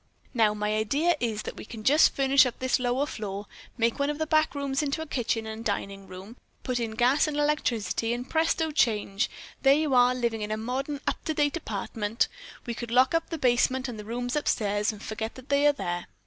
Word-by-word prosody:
Now, 220 -4 +3
my 210 0 -1
idea 280 +11 +2
is 220 -3 -2
that - - -7
we - - -7
can 220 0 -9
just 295 +7 +5
furnish 270 -1 +5
up 245 - -6
this 260 0 +1
lower 250 +3 +1
floor. 205 -7 -5 0.3
Make 230 +2 +1
one 280 +1 +1
of 295 - -2
the 315 - -1
back 310 0 +2
rooms 280 0 -1
into 295 +2 -2
a - - -8
kitchen 235 -6 -1
and 220 +1 -6
dining 200 -2 -3
room, 190 +6 -10 0.3
put 250 -1 -1
in 225 -2 -3
gas 255 +7 +3
and 300 -1 -3
electricity, 250 -7 0
and 245 +2 -3
presto 320 0 +1
change, 215 -5 +1 0.3
there 270 0 +6
you 305 -2 0
are 250 0 +5
living 235 -3 -1
in 210 - -3
a 215 - -1
modern 270 +6 -3
up - - -2
to 315 - -1
date 290 0 +1
apartment. 220 -5 -2 0.3
Then - - -20
we 235 - -3
could 235 0 -6
lock 255 +4 +4
up 330 0 0
the 330 - -3
basement 255 0 +2
and 235 -4 -6
the - - -6
rooms 245 +4 -3
upstairs 210 -8 +1
and 215 -1 -11
forget 220 +1 -4
they 280 +3 +1
are - - +7
there." 175 -10 -4
245 Hz, 220 wpm, -27 LUFS, 220-285 Hz, 0.3 s, are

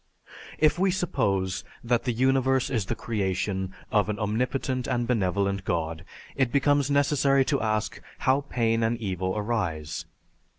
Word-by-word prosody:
"If 155 +3 +3
we 190 +1 +3
suppose 100 - 0 0.2
that 120 0 +1
the 125 - +1
universe 130 +2 +2
is 110 -7 -1
the - - -1
creation 95 -4 -2 0.2
of 105 -1 +2
an 105 - -1
Omnipotent 125 +4 -1
and 120 -1 0
Benevolent 100 -4 0
God, 80 -2 -2 0.3
it 130 -3 +1
becomes 145 0 +3
necessary 140 -1 +3
to 140 -1 0
ask 110 -1 -1 0.2
how 135 +2 +2
pain 115 -1 +1
and 115 +1 +1
evil 95 -3 -2
arise. 95 -9 -2
115 Hz, 140 wpm, -26 LUFS, 100-135 Hz, 0.3 s, If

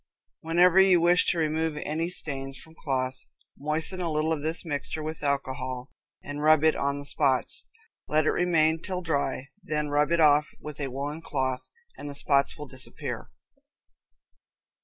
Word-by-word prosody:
Whenever 175 +3 +4
you 190 -2 +6
wish 175 +1 +4
to 175 - +2
remove 160 -1 0
any 160 +3 -1
stains 135 -6 -4
from 160 - -14
cloth, 130 -4 -2 0.4
moisten 155 +5 -2
a 170 -2 -1
little 155 +1 +1
of 150 - -3
this 160 +4 -1
mixture 150 0 -3
with 155 +1 -5
alcohol 130 -2 -2 0.3
and 145 0 -5
rub 155 0 +5
it 160 0 +4
on 140 0 -1
the 145 - -7
spots. 135 -3 +1 0.4
Let 155 0 +2
it - - +3
remain 165 -2 +2
till 185 -1 -4
dry, 140 -4 -1
then 150 -1 -2
rub 145 +1 +2
it 170 - +3
off 150 -1 +5
with 150 -1 -8
a 140 - -1
woolen 145 +4 -4
cloth, 130 -4 -2 0.3
and 145 - -6
the 140 - -6
spots 140 -1 +2
will 150 - -7
disappear. 130 -1 -6
150 Hz, 165 wpm, -27 LUFS, 140-160 Hz, 0.4 s, you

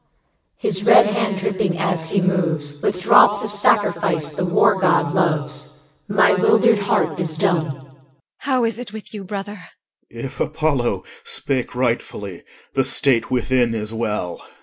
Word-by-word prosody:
His 190 -1 -2
red - - +7
hand 210 -1 -1
dripping 190 -2 -1
as 165 -2 -1
he 195 - +1
moves 160 -6 -1
With 180 -2 -1
drops 205 0 +5
of 215 - -4
sacrifice 170 -6 +1
the 180 +4 -3
War 190 +2 +3
god 180 -2 +2
loves. 150 -4 -2
My 205 0 +4
'wildered 220 +3 +3
heart 200 -2 0
is 160 -3 -2
dumb. 175 -4 +1
EL. 135 -1 -11 0.4
How 260 -3 0
is 230 0 -2
it 245 -4 -7
with 220 0 -10
you, 205 -2 -7
brother? 200 +1 -6
OR. 180 - -14 0.4
If 120 +3 -8
Apollo 150 -6 -1 0.2
Spake 130 -3 -2
rightfully, 115 -6 -3 0.3
the 135 - +2
state 130 -2 +1
within 125 -1 +1
is 105 0 -4
well. 105 -6 -3
EL. - - -17
170 Hz, 155 wpm, -20 LUFS, 140-200 Hz, 0.4 s, red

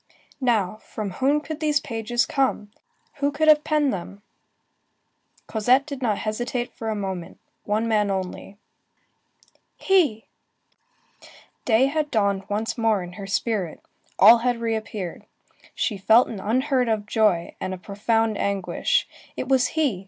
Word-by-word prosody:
Now, 215 -6 +1
from 215 -2 -6
whom 275 +9 +1
could 315 0 -6
these 300 -2 +2
pages 235 -1 -1
come? 265 -7 -1 0.5
Who 285 0 0
could 310 +2 0
have 300 -1 +6
penned 300 -3 +1
them? 195 +2 -7 1.2
Cosette 245 +5 +2
did 280 -3 -7
not 215 -5 +1
hesitate 240 +3 -3
a 220 -1 -2
moment. 190 -4 -5 0.3
One 215 +2 0
man 210 -2 +2
only. 190 +1 -4 1.2
He! 325 - +2 1.4
Day 235 +2 +4
had 300 +2 -1
dawned 200 -4 0
once 215 +3 -2
more 220 -4 +2
in 175 0 -9
her 195 0 -8
spirit; 195 -4 -2 0.4
all 225 +4 +8
had 245 0 0
reappeared. 220 -5 -4 0.5
She 210 -4 -1
felt 225 +6 +5
an 215 - -6
unheard 255 +4 +1
of 215 -2 0
joy, 210 -6 +1
and 185 - -3
a 185 - -4
profound 215 +3 -1
anguish. 200 - 0 0.3
It - - -3
was 260 -2 +3
he! 275 -12 +1
225 Hz, 135 wpm, -24 LUFS, 205-260 Hz, 1.4 s, all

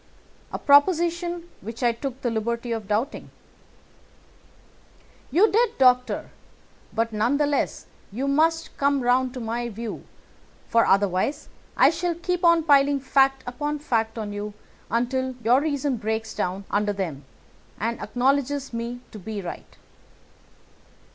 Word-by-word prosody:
"A - - -3
proposition 345 +3 +3
which 225 +5 -7
I 240 - +4
took 260 +2 -6
the 240 - -1
liberty 235 +2 -2
of 225 -3 -3
doubting." 220 +7 -2 2.0
"You 370 - +4
did, 470 +3 +2
Doctor, 250 -1 +3 0.6
but 230 0 -1
none 235 +6 +1
the 295 - +2
less 290 0 -1 0.3
you 255 +7 -3
must 325 +3 +1
come 280 -1 +2
round 250 +1 +2
to - - -4
my 235 +1 -3
view, 225 0 -6 0.6
for 230 0 +3
otherwise 195 +6 +1 0.3
I - - +6
shall 335 +1 -2
keep 360 +1 -2
on 335 -1 +5
piling 285 -2 +4
fact 270 0 +2
upon 295 +4 -3
fact 230 -6 -1
on 210 -2 -4
you 205 0 -5 0.3
until 255 +3 -1
your 245 +5 +4
reason 285 -3 -1
breaks 220 0 -3
down 190 +2 -3
under 205 0 +1
them 165 -8 -4 0.6
and 230 +2 -2
acknowledges 275 +1 0
me 235 +1 -4
to 215 - -9
be 210 +2 -5
right. 180 -3 -8
250 Hz, 135 wpm, -24 LUFS, 225-285 Hz, 2.0 s, I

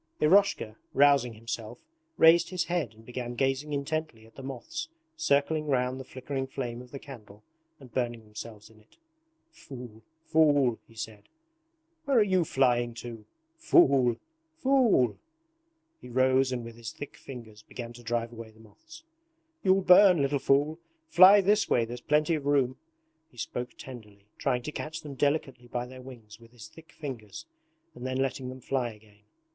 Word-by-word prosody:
Eroshka, 155 - +3 0.2
rousing 140 -4 +4
himself, 115 - -7 0.3
raised 165 +1 +6
his 180 -2 -1
head 160 - -2
and 110 +1 -18
began 120 0 -5
gazing 135 +3 0
intently 145 -5 -3
at 115 - -20
the - - -10
moths 320 - -6 0.3
circling 155 - +1
round 130 -1 0
the - - -6
flickering 135 +1 -5
flame 120 -3 -5
of 125 - -13
the 140 - -7
candle 110 -7 -12 0.4
and 130 -5 -15
burning 120 -2 -2
themselves 105 0 -10
in 110 - -20
it. 105 - -27 0.5
'Fool, 120 - -11 0.2
fool!' 145 -7 +3
he 115 - -20
said. 110 -2 -8 0.8
'Where 275 -3 +2
are 220 - +7
you 185 -3 +2
flying 120 -4 +1
to? 115 -2 -8 0.3
Fool, 135 - +4 0.4
fool!' 255 - +3 0.8
He - - -12
rose 130 +1 +3
and 125 -2 -3
with 115 0 -10
his 115 -2 -7
thick 145 - -9
fingers 115 -5 -11
began 120 +2 -8
to 120 - -12
drive 120 0 -2
away 115 -1 -9
the 110 0 -21
moths. 110 - -16 0.6
'You'll 190 0 +4
burn, 185 -1 +7
little 140 0 +1
fool! 145 +5 +2 0.3
Fly 195 - +8
this 205 +2 +2
way, 115 - +3
there's 120 +1 -7
plenty 150 +4 +2
of 145 -3 -2
room.' 135 -3 +2 0.5
He 120 - -24
spoke 125 +2 -5
tenderly, 105 -6 -11
trying 125 -3 0
to 150 - -4
catch 155 +1 -6
them 145 -2 -8
delicately 135 -3 -1
by 120 0 -3
their 130 +1 -11
wings 115 -4 -12
with 115 0 -18
his 115 -3 -11
thick 160 0 -17
fingers 115 -9 -8 0.5
and - - -11
then 130 0 -2
letting 135 -1 -2
them 130 0 -9
fly 125 -2 -2
again. 105 -1 -21
130 Hz, 165 wpm, -28 LUFS, 115-150 Hz, 0.8 s, Fly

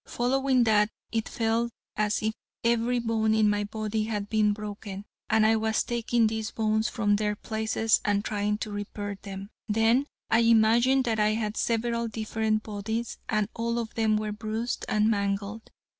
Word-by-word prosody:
Following 260 +1 +2
that, 210 -2 +4 0.2
it 225 -1 -1
felt 230 +1 0 0.2
as 210 0 0
if 220 0 0 0.3
every 235 +1 +2
bone 225 -2 +1
in 215 -1 +4
my 205 0 +1
body 215 0 -2
had 210 -2 -3
been 215 -1 +3
broken, 205 -1 -6 0.2
and 220 0 +4
I 220 +1 +5
was 220 0 +1
taking 235 -1 +1
these 220 0 -1
bones 220 0 0
from 205 -3 +1
their 210 0 0
places 220 0 0
and 205 0 +1
trying 210 0 0
to 215 - -8
repair 205 -1 -5
them. 195 0 -8 0.2
Then 225 +6 +3 0.2
I 225 - +5
imagined 235 +3 +4
that 225 -2 0
I 210 0 +3
had 215 -1 -2
several 235 +1 0
different 220 0 -1
bodies, 220 +2 -4
and 215 -2 +1
all 235 0 -1
of 230 -2 -3
them 220 -1 +2
were 215 0 -2
bruised 220 +3 -3
and 210 0 +3
mangled. 200 0 -1
220 Hz, 170 wpm, -27 LUFS, 210-230 Hz, 0.3 s, I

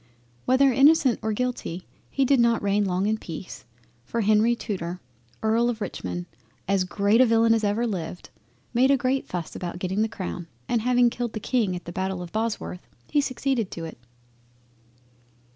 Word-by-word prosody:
Whether 260 +1 +4
innocent 275 -1 +5
or 220 - -1
guilty, 215 -6 -3 0.2
he 275 - +1
did 270 0 +4
not 235 -2 +3
reign 200 +1 +2
long 185 0 0
in 215 +1 0
peace, 170 -4 -8 0.4
for 230 - -2
Henry 215 +3 +4
Tudor 180 -5 -4 0.5
E. - - +3
of 230 +1 +2
Richmond 90 - -4 0.4
as 195 -1 +2
great 200 +5 +3
a - - +7
villain 225 0 +4
as 225 -1 +1
ever 210 +3 +1
lived, 180 -5 -5 0.4
made 255 +3 +4
a 275 - +5
great 260 +1 0
fuss 175 -3 -5
about 175 -1 -5
getting 190 +3 -1
the 220 - +1
Crown 180 -4 -5 0.2
and 235 -2 +1
having 245 0 +3
killed 240 -2 -3
the 215 - -3
King 215 -5 0
at 175 - -7
the 175 - -6
battle 190 0 -3
of 170 - -9
Bosworth, 215 -4 -3 0.2
he 295 - +4
succeeded 260 -5 -1
to 165 - -6
it. 160 - -9
220 Hz, 175 wpm, -25 LUFS, 185-245 Hz, 0.5 s, a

